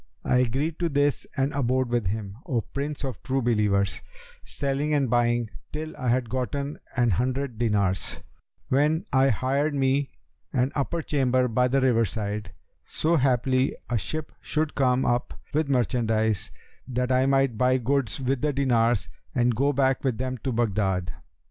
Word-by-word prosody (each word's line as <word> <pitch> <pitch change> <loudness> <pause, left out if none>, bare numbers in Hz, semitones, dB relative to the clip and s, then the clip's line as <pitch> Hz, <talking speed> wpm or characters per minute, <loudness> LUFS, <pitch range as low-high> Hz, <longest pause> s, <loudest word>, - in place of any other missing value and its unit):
I - - +3
agreed 135 +6 0
to 170 -1 +1
this 145 -1 +1
and 135 +3 +1
abode 130 -2 +1
with 120 -5 0
him, 100 0 -4
O 125 -7 +1
Prince 145 +5 -5
of 130 -2 -4
True 135 +1 -1
Believers, 105 -4 +1 0.4
selling 140 - -1
and 135 -5 +1
buying, 120 -2 +2 0.2
till 155 +1 -5
I 130 -4 -4
had 125 0 +2
gotten 130 +4 -3 0.2
an 120 -2 +3
hundred 125 +3 -1
dinars; 100 -6 0 0.5
when 150 +4 +2
I 135 0 +5
hired 140 +6 0
me 135 0 +1 0.4
an 130 0 +1
upper 155 +3 -1
chamber 130 -3 +2
by 125 +2 +2
the 135 +2 +2
river 120 -3 +3
side, 105 -2 -4 0.4
so 165 +2 +1
haply 130 -1 +2
a 120 - +2
ship 155 +7 -4
should 155 0 -1
come 130 -1 +2
up 120 0 0 0.2
with 155 -1 +1
merchandise, 115 -5 +1 0.4
that 125 0 -1
I 130 +1 +3
might 135 -3 +2
buy 130 +3 +3
goods 135 +1 0
with 130 -1 -1
the 150 -1 +1
dinars 120 -5 +2 0.3
and 125 0 +3
go 140 +5 +2
back 135 -1 +1
with 130 -5 0
them 130 0 -3
to 130 - -2
Baghdad. 100 -6 0
130 Hz, 160 wpm, -26 LUFS, 115-140 Hz, 0.5 s, I